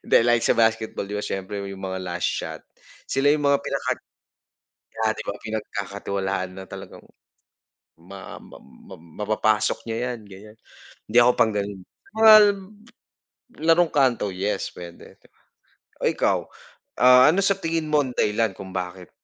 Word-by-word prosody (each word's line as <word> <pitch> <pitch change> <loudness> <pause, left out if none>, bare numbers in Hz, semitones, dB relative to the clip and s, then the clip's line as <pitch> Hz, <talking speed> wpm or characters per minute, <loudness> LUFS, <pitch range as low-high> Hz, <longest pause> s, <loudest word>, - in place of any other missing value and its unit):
Hindi - - +4
like 120 0 +2
sa - - +4
basketball, 110 -3 0
'di 105 - -4
ba 105 - -3
siyempre 100 +1 -4
yung 95 -1 -8
mga 95 -1 -4
last 90 -1 -2
shot, - - -5 0.5
sila 140 +2 +3
yung 150 -1 -1
mga 140 - +5
pinaka - - -2 1.1
kaya 110 0 +2
'di - - -7
ba - - -2
pinagkakatiwalaan 100 -3 -4
na - - -7
talagang - - -11 1.0
ma 95 +2 -10
ma - - -14
ma 65 +8 -15 0.3
mapapasok 110 0 +1
niya 120 +2 -2
yan 115 - -10
ganyan, 105 +3 -13 0.5
hindi 120 - +4
ako 120 - +5
pang 110 -2 +3
ganun. 100 -1 -3 0.4
Mga 220 -1 +9 1.3
larong 165 +1 +4
kanto, 125 -8 +2
yes 100 +1 -2
pwede. 85 -1 -12 0.9
O - - +2
ikaw, - - 0 0.6
ah, 125 +2 +8
ano 195 - +1
sa 200 -1 +3
tingin 165 -4 -2
mo 150 -1 +3
ang 125 - -6
dahilan 105 -2 0
kung 95 - -9
bakit 90 0 -5
105 Hz, 150 wpm, -23 LUFS, 95-125 Hz, 1.3 s, Mga